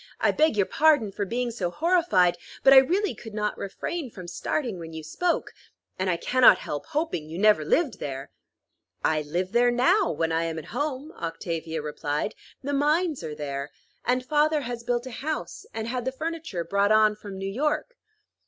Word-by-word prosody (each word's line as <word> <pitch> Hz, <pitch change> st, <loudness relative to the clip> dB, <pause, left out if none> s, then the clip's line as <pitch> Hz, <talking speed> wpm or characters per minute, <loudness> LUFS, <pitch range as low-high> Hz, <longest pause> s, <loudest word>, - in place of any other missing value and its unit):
"I -, -, +3 dB
beg 310 Hz, -8 st, +2 dB
your 200 Hz, -, +4 dB
pardon 290 Hz, -8 st, +3 dB
for 205 Hz, +1 st, -3 dB
being 240 Hz, +4 st, -2 dB
so 195 Hz, -6 st, -2 dB
horrified, 300 Hz, -, +3 dB, 0.3 s
but 270 Hz, -, +8 dB
I -, -, +9 dB
really 365 Hz, +10 st, +4 dB
could 220 Hz, -2 st, -10 dB
not 210 Hz, -1 st, -1 dB
refrain 265 Hz, -, -4 dB
from 185 Hz, -5 st, -10 dB
starting 215 Hz, -, -2 dB
when 165 Hz, -1 st, -8 dB
you 160 Hz, 0 st, -6 dB
spoke; 340 Hz, -, -1 dB, 0.5 s
and 185 Hz, 0 st, 0 dB
I 175 Hz, -, +1 dB
cannot 255 Hz, +6 st, +6 dB
help 145 Hz, -, -5 dB
hoping 290 Hz, -, -2 dB
you 165 Hz, -, -6 dB
never 210 Hz, -5 st, +4 dB
lived 275 Hz, -, +1 dB
there." 135 Hz, -1 st, -5 dB, 0.7 s
"I 155 Hz, -1 st, +2 dB
live 175 Hz, +5 st, -2 dB
there 240 Hz, +2 st, +4 dB
now, 345 Hz, -, +3 dB
when 165 Hz, 0 st, -1 dB
I 165 Hz, +1 st, +1 dB
am 165 Hz, -1 st, -3 dB
at 160 Hz, -, -6 dB
home," 290 Hz, +1 st, -3 dB
Octavia 165 Hz, -, -4 dB
replied. 150 Hz, +3 st, -2 dB, 0.3 s
"The 285 Hz, +2 st, -2 dB
mines 300 Hz, -, +1 dB
are 155 Hz, -2 st, -5 dB
there; 140 Hz, -1 st, -4 dB, 0.3 s
and 250 Hz, 0 st, 0 dB
father 300 Hz, +2 st, +2 dB
has 240 Hz, -2 st, -5 dB
built 240 Hz, 0 st, -1 dB
a 260 Hz, -, -7 dB
house, 305 Hz, +6 st, -5 dB
and 225 Hz, 0 st, -4 dB
had 245 Hz, 0 st, -3 dB
the 260 Hz, -, 0 dB
furniture 315 Hz, -, -4 dB
brought 200 Hz, +4 st, +1 dB
on 215 Hz, -1 st, +5 dB
from 205 Hz, -2 st, -9 dB
New 195 Hz, -, -5 dB
York." 305 Hz, -, -1 dB
225 Hz, 190 wpm, -26 LUFS, -, 0.7 s, I